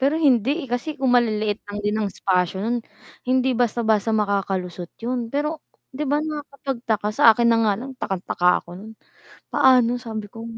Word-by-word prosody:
Pero 275 Hz, +3 st, +2 dB
hindi, 265 Hz, -6 st, +3 dB
eh, -, -, -11 dB
kasi 270 Hz, +5 st, -3 dB
kung 265 Hz, -3 st, +1 dB
maliliit 215 Hz, -3 st, +1 dB
lang 205 Hz, 0 st, -5 dB
din 210 Hz, -, +1 dB
ng 210 Hz, -, 0 dB
espasyo 180 Hz, -1 st, 0 dB
no'n, 240 Hz, +1 st, 0 dB, 0.5 s
hindi 260 Hz, 0 st, +2 dB
basta-basta 225 Hz, -3 st, +1 dB
makakalusot 195 Hz, -4 st, -2 dB
'yon. 240 Hz, -1 st, -2 dB
Pero 300 Hz, +2 st, -2 dB, 0.3 s
‘di 290 Hz, +2 st, -3 dB
ba 290 Hz, -, +2 dB
nakakapagtaka, 270 Hz, -8 st, -3 dB
sa -, -, 0 dB
akin 235 Hz, -1 st, +3 dB
na 230 Hz, -, +3 dB
nga -, -, +3 dB
lang 255 Hz, +5 st, -7 dB
takang-taka 180 Hz, -2 st, -1 dB, 0.2 s
ako -, -, -32 dB
no'n. 220 Hz, +2 st, -10 dB, 0.6 s
Paano, 245 Hz, -2 st, +4 dB
sabi 220 Hz, -3 st, -6 dB
ko. 225 Hz, -, -9 dB
235 Hz, 170 wpm, -22 LUFS, 210-260 Hz, 0.6 s, Paano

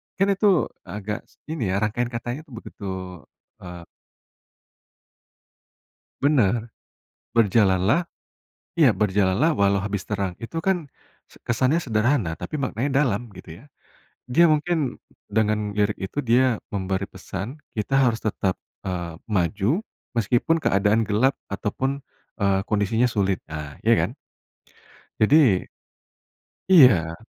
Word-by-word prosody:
Kan 195 Hz, +1 st, +2 dB
itu 195 Hz, -3 st, +2 dB, 0.2 s
agak, 105 Hz, +3 st, -5 dB
s -, -, -27 dB, 0.2 s
ini 140 Hz, -10 st, -2 dB
ya, 100 Hz, -, 0 dB
rangkaian 115 Hz, +3 st, 0 dB
katanya 120 Hz, +2 st, -5 dB
tuh, 135 Hz, -, -15 dB
begitu, 100 Hz, -3 st, -8 dB, 0.7 s
eee 90 Hz, -1 st, -9 dB, 2.4 s
Benar. 120 Hz, -5 st, +2 dB, 0.6 s
Berjalan 100 Hz, -4 st, +3 dB
lah 160 Hz, +9 st, +4 dB, 0.8 s
Iya -, -, +6 dB
berjalan 100 Hz, 0 st, +1 dB
lah 165 Hz, +2 st, +4 dB
walau 100 Hz, -1 st, +3 dB
habis 100 Hz, -1 st, -3 dB
terang, 100 Hz, -4 st, -3 dB
itu 165 Hz, +8 st, -5 dB
kan 180 Hz, -3 st, 0 dB, 0.4 s
se -, -, -21 dB
kesannya 130 Hz, +8 st, +1 dB
sederhana 110 Hz, -, 0 dB
tapi 155 Hz, -2 st, -5 dB
maknanya 135 Hz, +2 st, 0 dB
dalam, 120 Hz, -4 st, -1 dB
gitu 90 Hz, -2 st, -12 dB
ya. -, -, -16 dB, 0.7 s
Dia 145 Hz, +8 st, +5 dB
mungkin 155 Hz, -3 st, +1 dB, 0.2 s
dengan 105 Hz, 0 st, 0 dB
lirik 105 Hz, 0 st, 0 dB
itu, 95 Hz, +9 st, -4 dB
dia 125 Hz, -2 st, +2 dB
memberi 95 Hz, -1 st, -2 dB
pesan 120 Hz, +10 st, -7 dB, 0.2 s
kita 110 Hz, +5 st, -1 dB
harus 120 Hz, -4 st, +3 dB
tetap, 95 Hz, -3 st, -2 dB, 0.2 s
eee, 85 Hz, -3 st, -4 dB
maju 105 Hz, -, 0 dB, 0.3 s
meskipun 120 Hz, +8 st, +1 dB
keadaan 105 Hz, -2 st, +2 dB
gelap 115 Hz, +6 st, +3 dB, 0.2 s
ataupun, 130 Hz, +7 st, -3 dB, 0.4 s
eee, 95 Hz, -1 st, +3 dB
kondisinya 110 Hz, +3 st, +2 dB
sulit, 100 Hz, -5 st, 0 dB
ah 75 Hz, -2 st, -7 dB
iya -, -, +4 dB
kan? -, -, -3 dB, 1.1 s
Jadi 110 Hz, +8 st, +5 dB, 1.4 s
Iya. 100 Hz, -, +6 dB
110 Hz, 120 wpm, -24 LUFS, 100-130 Hz, 2.4 s, Iya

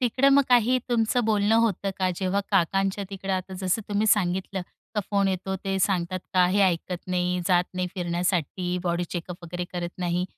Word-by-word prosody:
तिकडं 255 Hz, +2 st, +3 dB
मग 280 Hz, 0 st, +6 dB
काही 245 Hz, +1 st, +4 dB
तुमचं 235 Hz, 0 st, +2 dB
बोलणं 210 Hz, 0 st, +2 dB
होतं 205 Hz, -4 st, +1 dB
का? 185 Hz, -1 st, +1 dB
जेव्हा 195 Hz, +1 st, 0 dB
काकांच्या 195 Hz, +1 st, +1 dB
तिकडं 195 Hz, 0 st, -4 dB
आता 185 Hz, 0 st, -3 dB
जसं 190 Hz, +4 st, 0 dB
तुम्ही 205 Hz, +1 st, +1 dB
सांगितलं 190 Hz, -2 st, +1 dB, 0.3 s
का 210 Hz, -, +1 dB
फोन 200 Hz, -1 st, +2 dB
येतो 190 Hz, +1 st, -2 dB
ते 195 Hz, 0 st, 0 dB
सांगतात 185 Hz, -1 st, 0 dB, 0.2 s
का 180 Hz, -1 st, +5 dB
हे 200 Hz, +2 st, +2 dB
ऐकत 180 Hz, -1 st, 0 dB
नाही, 180 Hz, 0 st, 0 dB
जात 180 Hz, -2 st, +4 dB
नाही 185 Hz, 0 st, -1 dB
फिरण्यासाठी, 180 Hz, 0 st, -1 dB
बॉडी 175 Hz, 0 st, 0 dB
चेकअप 175 Hz, 0 st, -5 dB
वगैरे 175 Hz, +1 st, -4 dB
करत 175 Hz, -1 st, -3 dB
नाही, 175 Hz, 0 st, 0 dB
190 Hz, 180 wpm, -26 LUFS, 180-205 Hz, 0.3 s, मग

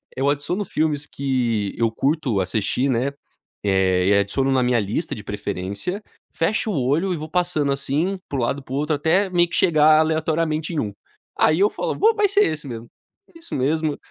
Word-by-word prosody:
eu 135 Hz, +2 st, +1 dB
adiciono 145 Hz, +8 st, -1 dB
filmes 150 Hz, -3 st, -1 dB
que 120 Hz, -8 st, -1 dB
eu 115 Hz, -1 st, +1 dB
curto 135 Hz, -3 st, 0 dB
assistir, 110 Hz, +7 st, 0 dB
né, 130 Hz, +2 st, 0 dB, 0.5 s
eh, 95 Hz, 0 st, +3 dB
adiciono 135 Hz, +7 st, 0 dB
na 130 Hz, -1 st, +2 dB
minha 125 Hz, -1 st, +2 dB
lista 110 Hz, -, -2 dB
de 105 Hz, -, -9 dB
preferência, 100 Hz, -, -4 dB, 0.3 s
fecho 215 Hz, +5 st, 0 dB
o 145 Hz, -, -1 dB
olho 170 Hz, +7 st, +1 dB
e -, -, -3 dB
vou 155 Hz, +1 st, -7 dB
passando, 175 Hz, -5 st, 0 dB
assim, 150 Hz, +8 st, -1 dB
para 140 Hz, -, -3 dB
o -, -, 0 dB
lado 135 Hz, +4 st, -1 dB
e -, -, -20 dB
para 130 Hz, -, -9 dB
o -, -, -1 dB
outro 150 Hz, +1 st, 0 dB
até 175 Hz, +7 st, +2 dB
meio 175 Hz, -1 st, +2 dB
que -, -, -4 dB
chegar, 155 Hz, -2 st, +5 dB
aleatoriamente, 160 Hz, 0 st, 0 dB
em 155 Hz, -, -1 dB
1, 105 Hz, -5 st, -3 dB, 0.4 s
aí, 155 Hz, +3 st, +3 dB
eu 205 Hz, -, +4 dB
falo: -, -, -3 dB
"Bom, 445 Hz, +2 st, +4 dB
vai 415 Hz, -2 st, +2 dB
ser 405 Hz, +1 st, +4 dB
esse 150 Hz, -2 st, -5 dB
mesmo, 115 Hz, -2 st, -7 dB, 0.5 s
é -, -, -13 dB
isso 330 Hz, -, -7 dB
mesmo", 150 Hz, +3 st, 0 dB
145 Hz, 200 wpm, -22 LUFS, 120-165 Hz, 0.5 s, chegar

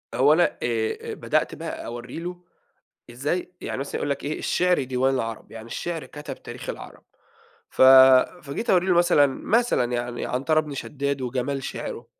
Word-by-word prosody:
هو 140 Hz, +5 st, +5 dB
أنا 175 Hz, -, +2 dB
آآ، 115 Hz, -2 st, -2 dB
بدأت -, -, -1 dB
بقى -, -, -6 dB
أورّي 120 Hz, +5 st, -7 dB
له 175 Hz, +1 st, -6 dB, 0.7 s
إزاي 150 Hz, +9 st, -3 dB
يعني -, -, -4 dB
مثلًا 140 Hz, -, -4 dB
يقول 145 Hz, -, -2 dB
لك 140 Hz, -, -3 dB
إيه: 150 Hz, -, -3 dB
"الشعر 180 Hz, -4 st, +1 dB
ديوان 130 Hz, +1 st, +1 dB
العرب" 115 Hz, -4 st, -4 dB
يعني 115 Hz, 0 st, -9 dB
الشعر 165 Hz, +7 st, -4 dB
كتب 150 Hz, 0 st, -9 dB
تاريخ -, -, -7 dB
العرب، -, -, -10 dB, 0.7 s
ف -, -, +1 dB, 0.6 s
فجيت 150 Hz, -, -3 dB
أورّي 180 Hz, 0 st, +3 dB
له 185 Hz, -, +3 dB
مثلًا، 175 Hz, -4 st, +5 dB, 0.2 s
مثلًا 235 Hz, -, +2 dB
يعني 120 Hz, 0 st, -3 dB
عنترة 145 Hz, +5 st, +1 dB
بن 150 Hz, -2 st, -7 dB
شداد 140 Hz, 0 st, -3 dB
وجمال 130 Hz, +2 st, -2 dB
شِعرُه، -, -, -6 dB
140 Hz, 160 wpm, -24 LUFS, 125-165 Hz, 0.7 s, هو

